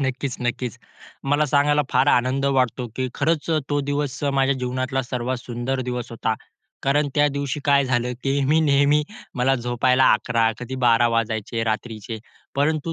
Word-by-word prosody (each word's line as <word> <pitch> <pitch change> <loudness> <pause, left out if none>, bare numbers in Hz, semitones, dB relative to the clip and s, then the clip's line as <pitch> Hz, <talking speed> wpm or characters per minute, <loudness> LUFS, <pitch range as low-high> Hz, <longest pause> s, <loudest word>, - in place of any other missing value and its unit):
नक्कीच, 130 -1 -2
नक्कीच. 125 -1 -3 0.5
मला 145 +2 +2
सांगायला 145 +1 +3
फार 135 - +3
आनंद 130 +1 +2
वाटतो, 125 0 0
की 130 0 -1
खरंच 155 +2 0
अ, 160 - +3
तो 145 0 +2
दिवस 145 0 -2 0.2
माझ्या 135 0 +3
जीवनातला 130 +1 -1
सर्वात 125 +1 -3
सुंदर 120 +2 -3
दिवस 125 -1 -4
होता 115 -1 -1 0.5
कारण 145 +2 +2
त्या 145 0 +4
दिवशी 140 +1 -3
काय 140 -1 +4
झालं, 125 -1 0
की 140 +1 +1
मी 150 +4 +3
नेहमी, 145 0 +3 0.3
मला 130 +2 +3
झोपायला 125 +1 +2
11, 115 +1 +2
कधी 125 +1 -6
12 120 0 +5
वाजायचे 115 0 -1
रात्रीचे 110 0 -4 0.4
परंतु 155 +3 0
130 Hz, 160 wpm, -23 LUFS, 120-140 Hz, 0.5 s, 12